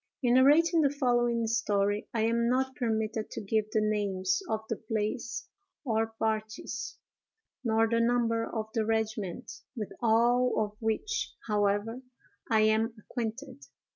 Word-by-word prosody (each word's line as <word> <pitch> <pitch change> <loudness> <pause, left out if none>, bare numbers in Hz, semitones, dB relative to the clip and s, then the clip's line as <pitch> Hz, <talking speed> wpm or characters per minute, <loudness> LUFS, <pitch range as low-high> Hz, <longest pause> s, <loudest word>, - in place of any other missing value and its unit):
In 245 -1 +4
narrating 315 +6 +5
the 285 - +4
following 240 -4 +1
story, 205 -2 0
I 225 - -1
am 235 +1 +2
not 260 +1 0
permitted 220 -2 -1
to - - -5
give 215 +1 0
the 215 - +1
names 195 -3 0
of 220 -1 0
the 225 - -2
place 220 +2 -3 0.4
or 225 -2 +1
parties, 220 -1 -3 0.7
nor 225 -1 +3
the 230 +1 +1
number 230 -1 +2
of 220 -1 -3
the 225 - +1
regiment, 220 -3 -2 0.2
with 215 -4 -5
all 240 +2 +3
of 210 -1 -2
which, 415 - -2
however, 210 +3 0 0.5
I 220 -2 +4
am 220 +1 +2
acquainted. 250 +5 -6
225 Hz, 140 wpm, -29 LUFS, 215-240 Hz, 0.7 s, narrating